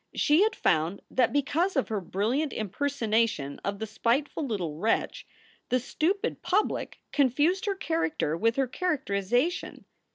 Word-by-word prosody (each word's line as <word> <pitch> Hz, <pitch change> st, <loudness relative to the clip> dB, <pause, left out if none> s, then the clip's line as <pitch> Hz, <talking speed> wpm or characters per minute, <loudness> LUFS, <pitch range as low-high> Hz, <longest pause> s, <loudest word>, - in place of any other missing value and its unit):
She 300 Hz, +5 st, +4 dB
had 440 Hz, +2 st, +3 dB
found 165 Hz, +3 st, +1 dB
that 255 Hz, -2 st, +3 dB
because 310 Hz, +7 st, +1 dB
of 270 Hz, -, +1 dB
her 215 Hz, -3 st, -1 dB
brilliant 230 Hz, -, -1 dB
impersonation 220 Hz, -, -1 dB
of 200 Hz, 0 st, -2 dB
the 220 Hz, -, -3 dB
spiteful 240 Hz, +8 st, 0 dB
little 195 Hz, -, -2 dB
wretch, 225 Hz, -, -1 dB, 0.4 s
the 255 Hz, -, +3 dB
stupid 380 Hz, -, -1 dB
public 410 Hz, +3 st, 0 dB
confused 295 Hz, -, +2 dB
her 400 Hz, -, +1 dB
character 325 Hz, -, -1 dB
with 230 Hz, +6 st, +1 dB
her 270 Hz, -, +2 dB
characterization. 250 Hz, -, -1 dB
255 Hz, 135 wpm, -28 LUFS, 210-315 Hz, 0.4 s, She